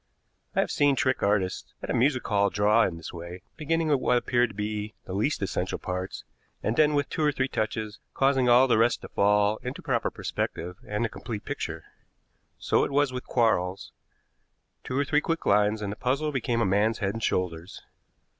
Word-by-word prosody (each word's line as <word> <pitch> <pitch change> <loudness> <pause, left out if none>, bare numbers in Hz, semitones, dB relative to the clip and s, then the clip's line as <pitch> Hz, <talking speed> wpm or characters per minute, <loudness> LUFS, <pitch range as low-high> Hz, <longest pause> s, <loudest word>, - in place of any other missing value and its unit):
I - - +4
have - - -2
seen 145 -1 +3
trick 130 -1 +1
artists 100 -2 0
at - - -3
a - - 0
music 130 +1 +2
hall 100 -1 +2
draw 105 +3 +3
in 85 - -3
this 80 - -8
way, 85 +1 -8
beginning 160 +1 0
with 145 -3 +3
what 125 -1 +2
appeared 120 0 +1
to 105 - -13
be 105 0 -4
the 95 - -6
least 105 +4 0
essential 95 -1 -2
parts, 90 +1 -5 0.4
and 110 - 0
then, 150 +1 +4
with 145 -1 +1
two - - -4
or 150 - +4
three 135 -1 -1
touches, 110 -3 -3 0.2
causing 135 -2 +3
all 125 +2 +6
the 115 - +3
rest 115 +2 +2
to - - -9
fall 105 +1 +2
into 125 +2 -6
proper - - 0
perspective 90 +2 -4
and 105 +3 -1
a - - +1
complete 110 -1 -7
picture. 80 - -4 0.7
So - - +1
it - - -1
was 140 -1 +1
with 125 - -6
Quarles. 95 -6 0 0.9
Two 130 - -3
or 140 - +2
three 150 +2 +2
quick 165 +1 -2
lines, 105 +1 +3
and 100 - -2
the - - -5
puzzle 140 +6 -1
became 120 -3 -1
a - - +3
man's 105 +4 +2
head 100 -2 -1
and 115 - -6
shoulders. 85 -1 -2
110 Hz, 200 wpm, -27 LUFS, 100-130 Hz, 0.9 s, all